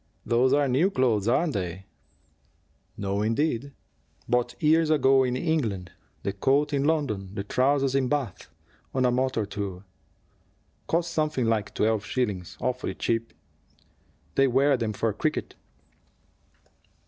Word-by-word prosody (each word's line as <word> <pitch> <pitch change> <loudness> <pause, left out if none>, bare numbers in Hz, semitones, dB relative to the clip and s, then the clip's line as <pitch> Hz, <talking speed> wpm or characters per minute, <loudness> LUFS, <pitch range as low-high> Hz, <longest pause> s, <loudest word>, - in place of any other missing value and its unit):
Those 125 +2 +3
are 145 -1 +3
new 135 +9 +3
clothes, 120 - +1
aren't 150 +6 +2
they?" 95 0 -4 1.1
"No, 100 0 -1
indeed. 120 +4 0 0.6
Bought 120 0 0
years 160 +1 +3
ago 135 -3 +4
in 125 -1 0
England 115 - -1 0.3
the 100 - -2
coat 140 +8 +1
in 140 0 +1
London, 135 -12 0
the 100 - -3
trousers 135 +5 +1
in 135 -2 +2
Bath, 135 -8 -3 0.5
on 130 -1 +2
a 125 - +3
motor 125 -3 0
tour. 100 -2 -5 1.0
Cost 170 +1 0
something 155 -6 0
like 110 -2 -1
twelve 110 -1 +1
shillings. 105 -7 -3
Awfully 125 0 -2
cheap. 115 0 -1 1.0
They 135 0 +4
wear 135 +3 +3
them 115 -3 -2
for - - -1
cricket." - - -2
125 Hz, 130 wpm, -26 LUFS, 105-140 Hz, 1.1 s, ago